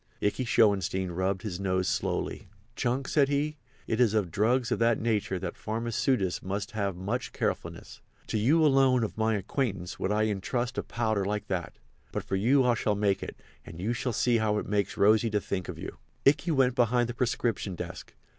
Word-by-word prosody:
Ikey 105 +5 0
Schoenstein 95 -5 +2
rubbed 95 +2 -1
his 95 -5 -4
nose 95 -1 0
slowly. 95 -4 -2 0.3
"Chunk," 130 +3 -1
said 140 -2 +3
he, 150 +2 0 0.3
"it 110 - -1
is 115 -4 +4
of 100 -6 0
drugs 115 +4 +1
of - - +1
that 115 0 +3
nature 105 -4 0
that 90 -1 -4
pharmaceutists 115 -2 -1
must 100 +4 -4
have 100 -4 -2
much 105 +8 -3
carefulness. - - -4 0.2
To 110 - -1
you 155 +9 +4
alone 135 -4 +4
of 110 - -3
my 110 0 +1
acquaintance 100 -3 -3
would 95 - -1
I 105 +1 +2
intrust 115 +5 -1
a - - 0
powder 110 -4 -1
like 105 +1 -2
that. 90 -3 -3 0.3
But - - -3
for 95 - -2
you 125 +7 +3
I 125 - +4
shall 110 -2 0
make 100 -1 +1
it, - - -7 0.2
and 80 - -11
you 110 +6 -1
shall 120 +1 -2
see 120 +1 +2
how 110 -1 +1
it - - -2
makes 100 -1 -1
Rosy 110 +3 +4
to 105 -1 +1
think 95 -2 -4
of - - -5
you." - - -7 0.3
Ikey 145 +5 +4
went 135 -5 +3
behind 120 -1 +2
the 120 - -4
prescription 115 -5 -1
desk. - - -8
110 Hz, 195 wpm, -28 LUFS, 100-120 Hz, 0.3 s, is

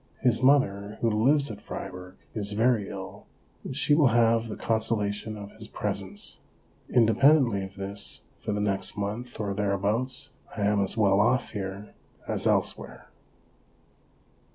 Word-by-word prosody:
His 120 -2 +3
mother, 105 -7 +3
who 115 - +2
lives 135 +5 +3
at 105 -1 -9
Fribourg, 90 -2 -7 0.2
is 105 -2 -1
very 110 -1 +2
ill, - - -8 0.4
and 130 - -5
she 150 - +3
will 145 -2 +5
have 115 -1 +3
the 110 - -5
consola 110 -2 0
tion 105 +1 -6
of 100 0 -8
his 110 0 -10
presence. 100 -1 -4 0.5
Independently 120 -1 +4
of 95 0 -9
this, 95 -8 -4 0.2
for - - -3
the 105 0 -1
next 100 0 -1
month 105 +4 -4
or 100 -2 -1
thereabouts, 105 +7 -1 0.3
I - - -2
am 105 0 +3
as 100 +3 -1
well 100 -2 +4
off 120 +4 +2
here 100 0 -6 0.3
as - - -1
elsewhere. - - -1
105 Hz, 150 wpm, -27 LUFS, 100-120 Hz, 0.5 s, will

